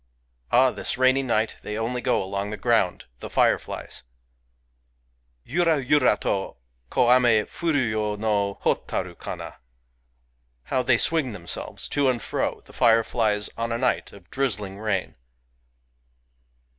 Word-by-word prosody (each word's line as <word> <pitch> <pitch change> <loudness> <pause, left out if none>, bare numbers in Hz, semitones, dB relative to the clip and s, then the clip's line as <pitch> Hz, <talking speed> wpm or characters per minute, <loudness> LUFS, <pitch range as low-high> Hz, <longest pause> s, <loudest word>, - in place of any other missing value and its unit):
Ah! 130 +1 +5
this - - -3
rainy 130 +1 +4
night 115 -4 0
they 105 0 -5
only 120 +2 -2
go 125 -6 +1
along 100 +1 -3
the 105 - -5
ground, 95 - +1
— - - -41
the - - -7
fireflies! - - 0 1.4
Yura 165 - +2
yura 130 -4 +3
to 95 -1 -1 0.3
Ko 120 0 +3
ame 120 -4 +4
furu 145 -7 0
yo 105 -1 -1
no 100 -2 0
Hotaru - - -1
kana! - - -7 1.1
How 130 - 0
they 120 -1 +3
swing 150 -3 0
themselves, 90 -4 -6
to 140 -2 +2
and 125 -2 0
fro, - - -2
the - - -16
fireflies, 115 -2 +2
on 115 0 -2
a 115 - 0
night 125 +1 0
of 95 -3 -15
drizzling 105 -7 -2
rain 105 - -2
115 Hz, 135 wpm, -25 LUFS, 105-130 Hz, 1.4 s, Ah